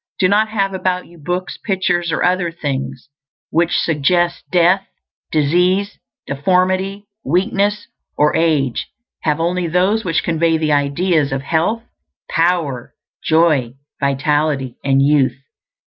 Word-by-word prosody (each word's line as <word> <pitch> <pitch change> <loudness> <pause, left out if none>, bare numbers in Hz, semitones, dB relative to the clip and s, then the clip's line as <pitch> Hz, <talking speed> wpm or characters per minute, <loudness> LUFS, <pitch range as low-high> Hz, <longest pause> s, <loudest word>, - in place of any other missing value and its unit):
Do 185 - +3
not 210 +3 +2
have 195 -3 -1
about 185 -1 -1
you 170 0 -17
books, 180 +5 -4
pictures, 180 -4 0
or - - 0
other 180 -1 +1
things 135 -5 -4 0.4
which 170 +1 +2
suggest 170 +3 +1
death, 180 +2 +3 0.4
disease, 180 +6 +1 0.3
deformity, 185 +6 0 0.2
weakness, 200 - 0 0.3
or 150 0 +3
age; 150 -7 +1 0.3
have 150 0 0
only 175 +1 0
those 185 +6 +1
which 165 -3 0
convey 165 0 +1
the 155 -1 0
ideas 145 +1 +1
of 135 0 -2
health, 170 +10 0 0.5
power, 165 -7 0 0.3
joy, 155 -7 +2 0.3
vitality, 140 -1 0
and 135 0 +3
youth. 140 -3 +2
170 Hz, 120 wpm, -18 LUFS, 145-185 Hz, 0.5 s, Do